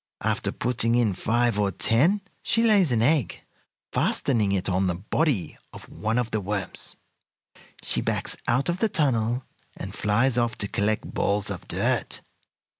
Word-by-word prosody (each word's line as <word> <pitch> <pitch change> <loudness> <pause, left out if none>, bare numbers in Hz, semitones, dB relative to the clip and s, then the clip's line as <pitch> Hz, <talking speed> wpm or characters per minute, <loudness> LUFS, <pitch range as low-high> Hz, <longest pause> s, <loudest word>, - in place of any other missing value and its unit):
"After - - 0
putting 120 -1 +1
in 115 -5 +2
five 115 +3 +1
or 100 -1 +2
ten 135 - +2 0.2
she 230 - +1
lays 205 - +4
an 115 -2 +2
egg, 145 0 +1 0.5
fastening 110 -7 +1
it 95 -2 0
on 95 0 +1
the 90 - 0
body 105 - -1
of - - -11
one 110 +2 -2
of 120 -1 -1
the 110 - -1
worms. 100 0 -4 0.9
She - - -1
backs - - 0
out 120 +4 +1
of 175 +1 0
the 220 - +2
tunnel, 125 - +1 0.3
and - - -7
flies 115 +4 +2
off 120 -2 0
to 100 - 0
collect 105 +2 -1
balls 100 0 0
of - - -7
dirt. - - -1
115 Hz, 160 wpm, -25 LUFS, 105-130 Hz, 0.9 s, lays